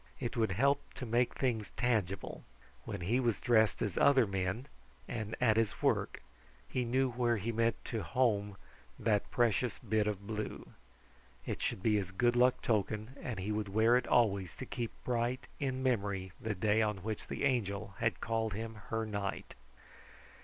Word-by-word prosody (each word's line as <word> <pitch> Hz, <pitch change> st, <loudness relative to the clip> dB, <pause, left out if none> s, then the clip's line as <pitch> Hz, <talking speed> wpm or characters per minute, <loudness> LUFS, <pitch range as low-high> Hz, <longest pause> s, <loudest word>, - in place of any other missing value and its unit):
It 120 Hz, 0 st, -3 dB
would 110 Hz, -5 st, +1 dB
help 140 Hz, +8 st, +1 dB
to 130 Hz, -, -5 dB
make 120 Hz, +1 st, +1 dB
things 115 Hz, -6 st, 0 dB
tangible. 110 Hz, -6 st, -1 dB, 0.4 s
When -, -, -5 dB
he 110 Hz, +9 st, +1 dB
was 120 Hz, -4 st, +1 dB
dressed 110 Hz, -3 st, +3 dB
as 100 Hz, -4 st, -1 dB
other 135 Hz, -4 st, +6 dB
men, 95 Hz, +4 st, -2 dB, 0.4 s
and 110 Hz, -2 st, -4 dB
at 110 Hz, -3 st, +4 dB
his 115 Hz, -3 st, +1 dB
work, -, -, 0 dB, 0.4 s
he 125 Hz, -, -1 dB
knew 130 Hz, +2 st, +2 dB
where 120 Hz, -1 st, +1 dB
he 110 Hz, +4 st, -2 dB
meant 115 Hz, 0 st, +2 dB
to 115 Hz, -3 st, -2 dB
home 105 Hz, -6 st, +1 dB, 0.4 s
that 105 Hz, -3 st, +1 dB
precious 120 Hz, 0 st, +1 dB
bit 110 Hz, -1 st, 0 dB
of 100 Hz, -2 st, -3 dB
blue. 105 Hz, 0 st, -4 dB, 0.8 s
It -, -, -3 dB
should 95 Hz, -, -2 dB
be 110 Hz, -2 st, +4 dB
his 95 Hz, -3 st, -2 dB
good 120 Hz, +5 st, +2 dB
luck 125 Hz, +1 st, +4 dB
token, 110 Hz, +2 st, 0 dB
and 120 Hz, -5 st, -4 dB
he 95 Hz, +3 st, -2 dB
would 105 Hz, -1 st, -2 dB
wear 110 Hz, +4 st, +4 dB
it 125 Hz, -1 st, +1 dB
always 100 Hz, -7 st, +2 dB
to 130 Hz, -, -6 dB
keep 120 Hz, -2 st, -3 dB
bright 125 Hz, +1 st, -1 dB
in 130 Hz, -2 st, -1 dB
memory 100 Hz, -7 st, 0 dB
the 110 Hz, -1 st, -2 dB
day 105 Hz, +3 st, +2 dB
on 105 Hz, -4 st, -1 dB
which 110 Hz, -1 st, -4 dB
the -, -, -4 dB
Angel 105 Hz, -6 st, 0 dB
had -, -, +1 dB
called 110 Hz, -2 st, -1 dB
him 115 Hz, +2 st, -4 dB, 0.2 s
her 110 Hz, 0 st, -1 dB
knight. 100 Hz, -2 st, -4 dB
110 Hz, 175 wpm, -33 LUFS, 105-120 Hz, 0.8 s, other